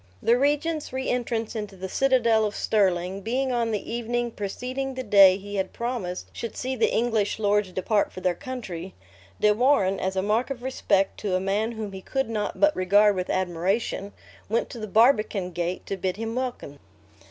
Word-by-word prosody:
The 235 - +3
regent's 295 +4 0
re 260 0 -3
entrance 235 -2 -2
into 210 -3 -5
the 190 0 -6
citadel 235 -1 +3
of 210 -1 -2
Stirling, 190 -2 +1
being 255 +5 -1
on 235 -2 0
the 215 +1 -3
evening 240 0 -1
preceding 255 +6 -4
the 260 - -4
day 195 -4 +7
he 205 +1 -6
had 190 -1 -2
promised 235 -7 -4
should 230 - -6
see 260 +1 -2
the 230 - +2
English 225 -3 +1
lords 205 -2 +1
depart 200 +3 0
for - - -8
their 180 -1 +1
country, 190 -6 -7 0.4
De 210 0 +4
Warenne, 215 -5 +2
as 190 +1 -2
a 190 - 0
mark 220 +6 +1
of 255 -3 -5
respect 200 -7 0
to 200 -3 -1
a - - +2
man 205 +4 -1
whom 215 -2 -5
he 190 -1 -8
could 270 +3 -2
not 210 -2 -3
but 300 0 +4
regard 205 +3 +4
with 185 -1 -3
admiration, 185 +3 -1 0.4
went 225 +2 0
to 240 - -7
the 215 - -5
barbican 215 -4 +3
gate 175 +1 -3
to 195 - -4
bid 185 0 -2
him 225 +1 -4
welcome. 245 - -4
215 Hz, 190 wpm, -25 LUFS, 190-240 Hz, 0.4 s, day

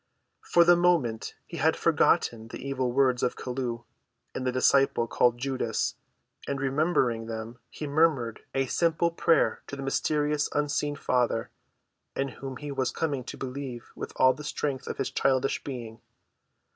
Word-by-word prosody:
For 170 - +4
the 175 +1 +6
moment 165 -11 +1
he - - -8
had - - +3
forgotten 115 -1 +2
the - - -7
evil 130 -2 -1
words 130 -1 +3
of 125 - 0
Chelluh 125 -2 -4 0.5
and 130 - -3
the - - +2
disciple 135 0 +3
called 120 +1 +2
Judas; 130 -3 -1 0.5
and, 140 -1 -2
remembering 135 -5 +1
them, 115 +2 -6
he 150 - -6
murmured 145 -6 +2 0.2
a 135 0 +2
simple 170 +4 +1
prayer 165 0 +2
to - - -6
the 135 - -6
mysterious, 150 +2 0
unseen 145 0 0
Father, 125 -4 0 0.6
in 135 0 -1
whom 135 0 -7
he 145 +1 -6
was 130 -2 0
coming 145 -5 -2
to - - -7
believe 130 -2 -6
with - - -6
all 130 0 +5
the 150 - -10
strength 140 -2 -3
of - - -4
his - - -2
childish 135 0 +1
being. 120 -5 -7
135 Hz, 160 wpm, -28 LUFS, 125-145 Hz, 0.6 s, the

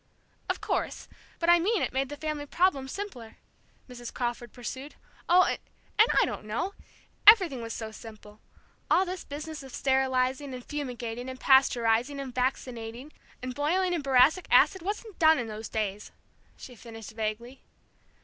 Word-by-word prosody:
"Of - - -1
course; - - -2 0.3
but 335 - -2
I 345 0 +7
mean 405 +4 +1
it - - -2
made 265 0 0
the 290 - -7
family 305 -1 -4
problem 310 -5 +1
simpler," 260 - -7 0.5
Mrs. 245 -2 -8
Crawford 240 -1 -3
pursued. 260 +4 -7 0.3
"Oh 360 +1 +7
and - - -1 0.6
I - - +5
don't - - -6
know! 290 - -2 0.5
Everything 370 - +8
was 230 0 -6
so 220 -1 -6
simple. 215 -1 -12 0.5
All 375 - +4
this 365 0 -5
business 300 +2 -7
of 265 -1 -11
sterilizing, 265 0 +1
and 250 - -9
fumigating, 245 -4 -5
and 260 0 -8
pasteurizing, 250 0 +3
and 265 -2 -6
vaccinating, 250 +1 -3 0.3
and 255 0 -4
boiling 355 +7 +1
in 340 - -1
boracic 275 +6 +4
acid 380 - +5
wasn't 415 +3 -5
done 320 -1 +6
in 245 - -2
those 220 0 -7
days," 210 -1 -3 0.5
she 255 - -11
finished 225 -2 -10
vaguely. 220 +4 -4
265 Hz, 155 wpm, -28 LUFS, 235-310 Hz, 0.6 s, Everything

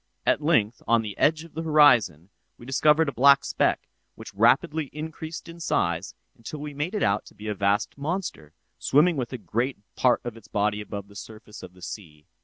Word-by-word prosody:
At - - +2
length, 120 -8 +1
on 115 0 +3
the 105 -3 -6
edge 155 +1 +2
of 165 - -15
the 160 - -4
horizon, 120 - +4 0.3
we 120 - -13
discovered 150 +4 +3
a - - -1
black 140 +2 +5
speck, - - 0 0.3
which - - -11
rapidly 155 -1 +2
increased 160 +2 -7
in 170 0 -11
size 85 - -1 0.2
until 130 +5 -8
we 145 0 -6
made 150 +8 -3
it 210 - 0
out 100 +1 +1
to - - -16
be 105 - -9
a 105 - -1
vast 100 +6 0
monster, 150 - -4 0.3
swimming 160 +5 +3
with 125 -4 -3
a 130 - -4
great 120 +4 -2 0.2
part 125 -1 +2
of 120 -2 -6
its 115 -3 -15
body 105 +1 -1
above 100 -1 -7
the 100 - -18
surface 110 +1 -11
of 90 0 -12
the 90 - -16
sea. 75 -7 -9
120 Hz, 205 wpm, -25 LUFS, 105-150 Hz, 0.3 s, black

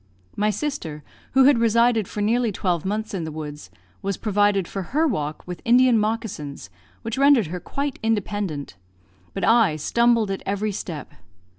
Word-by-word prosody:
My 210 +1 +1
sister, 210 - -4 0.3
who 265 +1 +6
had 265 -2 +5
resided 230 -2 +3
for 210 - -5
nearly 230 +2 +2
twelve 180 -4 -1
months 215 +3 -2
in 185 -4 -2
the 160 - -5
woods, 150 -6 -7 0.3
was 195 -1 -2
provided 205 -3 +1
for 195 - -4 0.2
her 320 - +4
walk 150 - -3
with 180 -1 -7
Indian 245 +1 +5
moccasins, 210 - -3 0.3
which 225 +3 -3
rendered 275 -6 +5
her 180 - -3
quite 280 - -4
independent; 205 - -2 0.6
but 195 - -3
I 225 -6 +4
stumbled 230 +6 +2
at 195 - -3
every 205 +2 -1
step. 165 -7 -6
210 Hz, 160 wpm, -23 LUFS, 175-235 Hz, 0.6 s, who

